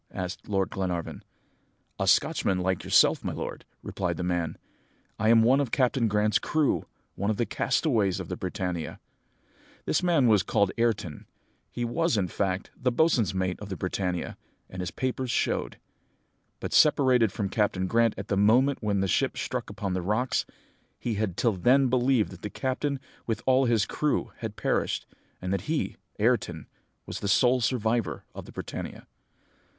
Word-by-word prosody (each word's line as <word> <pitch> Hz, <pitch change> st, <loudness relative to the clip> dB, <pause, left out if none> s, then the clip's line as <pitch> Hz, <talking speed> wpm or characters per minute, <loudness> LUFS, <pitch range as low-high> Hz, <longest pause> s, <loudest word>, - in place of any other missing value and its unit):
asked 90 Hz, +2 st, -6 dB
Lord 95 Hz, -2 st, 0 dB
Glenarvan. 90 Hz, -4 st, -3 dB, 0.8 s
"'A -, -, 0 dB
Scotchman 95 Hz, -, +3 dB
like 90 Hz, 0 st, -1 dB
yourself, -, -, +4 dB
my -, -, -2 dB
lord,' -, -, -6 dB, 0.2 s
replied 90 Hz, -3 st, -2 dB
the 90 Hz, -, -3 dB
man; 90 Hz, -2 st, -1 dB, 0.6 s
'I 110 Hz, +1 st, +2 dB
am 115 Hz, -1 st, +6 dB
one 130 Hz, +4 st, +5 dB
of 140 Hz, -4 st, 0 dB
Captain 125 Hz, -2 st, +2 dB
Grant's 105 Hz, 0 st, +2 dB
crew 155 Hz, -2 st, 0 dB, 0.3 s
one 100 Hz, +2 st, -2 dB
of 110 Hz, -, 0 dB
the 120 Hz, -, +1 dB
castaways 115 Hz, -, +1 dB
of -, -, -5 dB
the -, -, -4 dB
Britannia.' 90 Hz, -3 st, -4 dB, 0.9 s
"This -, -, +1 dB
man 170 Hz, -7 st, +3 dB
was 110 Hz, -4 st, +5 dB
called 100 Hz, 0 st, +1 dB
Ayrton. 105 Hz, -10 st, -1 dB, 0.4 s
He 120 Hz, -, -3 dB
was, 165 Hz, +3 st, +1 dB
in 95 Hz, -3 st, 0 dB
fact, 95 Hz, 0 st, -2 dB
the 125 Hz, 0 st, 0 dB
boatswain's 120 Hz, -, +2 dB
mate 95 Hz, -1 st, -1 dB
of 105 Hz, -, -8 dB
the 95 Hz, -, -4 dB
Britannia, 90 Hz, -1 st, -2 dB, 0.3 s
as 95 Hz, -, -7 dB
his 90 Hz, -2 st, -2 dB
papers 130 Hz, +4 st, -3 dB
showed. -, -, -1 dB, 0.8 s
But, -, -, -5 dB
separated 130 Hz, -7 st, +5 dB
from 100 Hz, -1 st, -2 dB
Captain 100 Hz, -3 st, 0 dB
Grant 115 Hz, +3 st, +2 dB
at 100 Hz, 0 st, -6 dB
the 100 Hz, -, 0 dB
moment 120 Hz, +8 st, +4 dB
when 100 Hz, -3 st, 0 dB
the 95 Hz, -, +1 dB
ship -, -, +1 dB
struck -, -, -3 dB
upon 100 Hz, -3 st, -3 dB
the 90 Hz, -, -1 dB
rocks, 105 Hz, +8 st, 0 dB, 0.5 s
he 120 Hz, -, -2 dB
had 105 Hz, -4 st, -2 dB
till 115 Hz, -3 st, +2 dB
then 125 Hz, +8 st, +3 dB
believed 125 Hz, -2 st, +2 dB
that -, -, -11 dB
the 105 Hz, -, -4 dB
captain 135 Hz, +3 st, -2 dB, 0.3 s
with 115 Hz, -1 st, -2 dB
all 130 Hz, 0 st, +4 dB
his 115 Hz, -4 st, +2 dB
crew 150 Hz, +4 st, -1 dB
had 110 Hz, -2 st, -5 dB
perished, -, -, -1 dB, 0.3 s
and 90 Hz, +1 st, -3 dB
that 100 Hz, +5 st, -3 dB
he, 160 Hz, -1 st, -1 dB, 0.2 s
Ayrton, -, -, 0 dB, 0.4 s
was -, -, -5 dB
the 100 Hz, -, -3 dB
sole 125 Hz, +6 st, +4 dB
survivor 115 Hz, -1 st, 0 dB
of -, -, -8 dB
the -, -, -12 dB
Britannia. -, -, -7 dB
110 Hz, 170 wpm, -27 LUFS, 95-125 Hz, 0.9 s, am